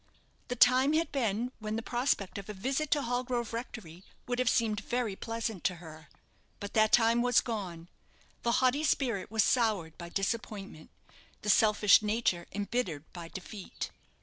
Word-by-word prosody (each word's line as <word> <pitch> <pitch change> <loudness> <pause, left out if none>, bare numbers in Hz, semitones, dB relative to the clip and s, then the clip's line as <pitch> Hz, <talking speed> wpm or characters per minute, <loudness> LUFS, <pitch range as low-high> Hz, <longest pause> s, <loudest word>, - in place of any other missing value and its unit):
The 245 - -3
time 255 +4 +5
had 325 +2 +1
been 240 -2 -1
when 215 0 -3
the 225 - -3
prospect 240 -6 -1
of 200 - -10
a 210 - -5
visit 270 +9 -1
to 295 -2 +2
Hallgrove 245 -1 -2
Rectory 210 -7 -7 0.2
would 245 0 -2
have 255 -2 +3
seemed 220 -4 +1
very 240 -4 -2
pleasant 225 -3 -4
to 180 - +2
her. 160 -3 -12 0.5
But 200 0 -7
that 215 -1 +4
time 230 0 +5
was 245 0 +4
gone. 185 -8 -5 0.5
The 235 - +1
haughty 255 +4 +2
spirit 240 -10 0
was 220 0 +2
soured 210 -10 +1
by 170 -1 -7
disappointment, 195 -4 -4 0.5
the 210 - +3
selfish 210 0 +5
nature 210 -5 0
embittered 200 -7 -3
by 170 -2 -7
defeat. 190 +3 -7
220 Hz, 160 wpm, -31 LUFS, 195-245 Hz, 0.5 s, time